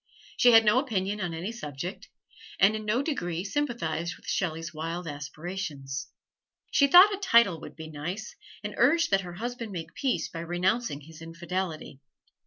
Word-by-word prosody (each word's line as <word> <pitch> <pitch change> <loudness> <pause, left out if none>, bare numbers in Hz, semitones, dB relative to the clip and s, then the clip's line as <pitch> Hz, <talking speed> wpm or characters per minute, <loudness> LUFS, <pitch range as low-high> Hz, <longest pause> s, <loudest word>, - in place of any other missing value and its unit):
She 245 - +6
had 225 0 +8
no 210 +4 +5
opinion 210 -6 -2
on 175 -2 -2
any 165 +6 -4
subject, 175 - -7 0.5
and 200 +3 +5
in 215 0 -5
no 235 +6 +1
degree 175 - -2
sympathized 195 - -2
with - - -20
Shelley's 165 -3 -2
wild 165 +2 -4
aspirations. 150 -2 -5 0.6
She 280 - +5
thought 365 +8 +8
a 395 - -4
title 235 - +4
would - - -10
be 160 -1 -8
nice, 175 +9 -6 0.3
and 210 0 -4
urged 305 +5 +4
that 195 0 +4
her 175 -2 -8
husband 235 +2 -5
make 170 -4 -6
peace 255 -12 -1
by 165 - -8
renouncing 175 0 -1
his 160 +2 -13
"infidelity." 165 -2 -5
185 Hz, 165 wpm, -28 LUFS, 165-230 Hz, 0.6 s, had